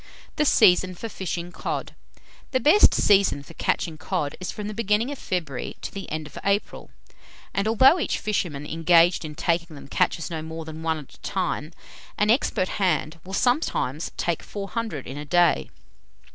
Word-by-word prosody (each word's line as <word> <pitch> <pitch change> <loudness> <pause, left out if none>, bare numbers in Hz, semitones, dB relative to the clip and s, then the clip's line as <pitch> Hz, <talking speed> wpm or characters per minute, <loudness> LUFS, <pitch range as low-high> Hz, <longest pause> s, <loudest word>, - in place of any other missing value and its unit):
THE 300 - +3
SEASON 185 -7 +5
FOR 225 +6 -6
FISHING 175 -3 -4
COD. - - -4 0.6
The 260 - +3
best 305 - +6
season 195 -8 +3
for 165 - -13
catching 160 -1 -1
cod 160 -5 -2
is 185 - -4
from 210 -1 -6
the 215 - -4
beginning 220 +3 +1
of 285 - -6
February 160 -9 -3
to - - -5
the 195 -1 -7
end 155 0 -3
of 150 - -9
April; 200 +1 -1 0.6
and 200 +2 0
although 260 - +6
each - - -1
fisherman 170 -9 -2
engaged 165 +3 +4
in 150 -1 -7
taking 170 0 -1
them, 140 - -11
catches 165 +4 0
no 160 -2 -3
more 160 0 -7
than 160 0 -8
one 160 -1 0
at 150 -3 -11
a - - -18
time, 175 -4 -2 0.5
an 210 +1 +3
expert 215 -6 +1
hand 165 -3 0
will 190 +1 -5
sometimes 245 - 0
take 170 -2 -1
four 200 -1 -7
hundred 220 - -4
in 135 +3 -7
a - - -5
day. 175 +2 +3
175 Hz, 180 wpm, -25 LUFS, 160-210 Hz, 0.6 s, best